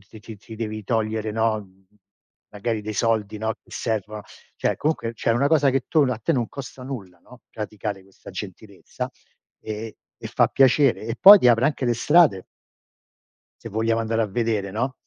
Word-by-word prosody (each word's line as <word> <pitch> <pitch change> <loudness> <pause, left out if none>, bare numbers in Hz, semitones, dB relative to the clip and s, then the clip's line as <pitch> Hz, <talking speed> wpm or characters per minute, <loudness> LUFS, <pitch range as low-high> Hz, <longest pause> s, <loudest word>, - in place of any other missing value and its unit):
ci 95 +3 -15
ci 110 0 -10
ci 110 +2 -12
devi 110 -1 -5
togliere, 110 0 -1
no, 110 0 0
mhmm, 95 -1 -19 0.6
magari 110 +2 -3
dei 105 +1 -6
soldi, 110 -1 0
no, 110 +1 -2
che - - -23
servono. 105 -1 -3 0.3
Cioè, - - -1
comunque 150 -7 -1
c'è 115 - -1
una 120 +5 +2
cosa 145 -2 +3
che 135 0 +1
tu 160 - 0
a 125 - -1
te 110 - -1
non 120 -4 -1
costa 135 -1 -9
nulla, 105 -10 -8
no, 125 +7 -18
praticare 105 -2 -5
questa 95 0 -15
gentilezza, - - -8 0.5
ehm, 110 +1 -6 0.3
e - - -7
fa - - +2
piacere. 135 0 +3
E 115 +2 -4
poi 200 +2 +11
ti 125 - +4
apre 120 +3 +4
anche 145 -3 -1
le 120 - +2
strade 145 - +3 1.2
se - - -7
vogliamo 115 +2 0
andare 115 0 -1
a - - 0
vedere, 105 -2 -1
no. 125 +6 -2
115 Hz, 185 wpm, -23 LUFS, 105-125 Hz, 1.2 s, poi